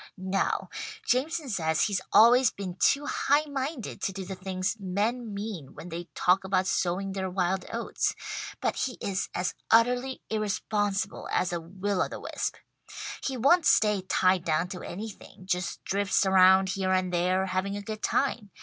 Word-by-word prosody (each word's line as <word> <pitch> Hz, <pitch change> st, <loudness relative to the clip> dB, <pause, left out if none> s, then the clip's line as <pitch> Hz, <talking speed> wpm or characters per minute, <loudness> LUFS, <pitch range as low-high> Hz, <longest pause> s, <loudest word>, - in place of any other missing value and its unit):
"No. 190 Hz, +1 st, -1 dB, 0.3 s
Jameson 285 Hz, +3 st, 0 dB
says 160 Hz, -7 st, +1 dB
he's 200 Hz, -3 st, 0 dB
always 240 Hz, +2 st, +7 dB
been 190 Hz, -4 st, -6 dB
too 285 Hz, +1 st, +3 dB
high 290 Hz, +1 st, +2 dB
minded 275 Hz, -3 st, -4 dB
to -, -, 0 dB
do 190 Hz, 0 st, -6 dB
the 190 Hz, -, -5 dB
things 185 Hz, +1 st, -2 dB
men 210 Hz, +5 st, -1 dB
mean 200 Hz, -9 st, -6 dB
when 180 Hz, -, -9 dB
they 170 Hz, +1 st, -5 dB
talk 180 Hz, +2 st, +3 dB
about 190 Hz, -1 st, +1 dB
sowing 190 Hz, +1 st, 0 dB
their 190 Hz, -1 st, -3 dB
wild 185 Hz, 0 st, 0 dB
oats; -, -, -1 dB, 0.5 s
but -, -, 0 dB
he 255 Hz, -, -2 dB
is 195 Hz, -1 st, -2 dB
as 180 Hz, +1 st, -1 dB, 0.2 s
utterly 245 Hz, +3 st, +3 dB
irresponsible 205 Hz, -1 st, -1 dB
as 175 Hz, -, +1 dB
a 170 Hz, -, -2 dB
will 190 Hz, +3 st, -2 dB
o -, -, +2 dB
the -, -, -7 dB
wisp. -, -, -3 dB, 0.7 s
He 265 Hz, -2 st, -2 dB
won't 290 Hz, +8 st, +4 dB
stay 210 Hz, -2 st, +4 dB
tied 185 Hz, -1 st, +2 dB
down 165 Hz, +2 st, 0 dB
to 180 Hz, -2 st, -6 dB
anything 200 Hz, -1 st, -8 dB
just 180 Hz, 0 st, -2 dB
drifts 200 Hz, 0 st, +1 dB
around, 190 Hz, 0 st, +6 dB
here 190 Hz, -1 st, -1 dB
and 185 Hz, -1 st, 0 dB
there, 180 Hz, +2 st, +2 dB
having 190 Hz, +2 st, -2 dB
a 205 Hz, -, -6 dB
good 215 Hz, +1 st, -6 dB
time. 240 Hz, -7 st, 0 dB
195 Hz, 170 wpm, -28 LUFS, 185-220 Hz, 0.7 s, always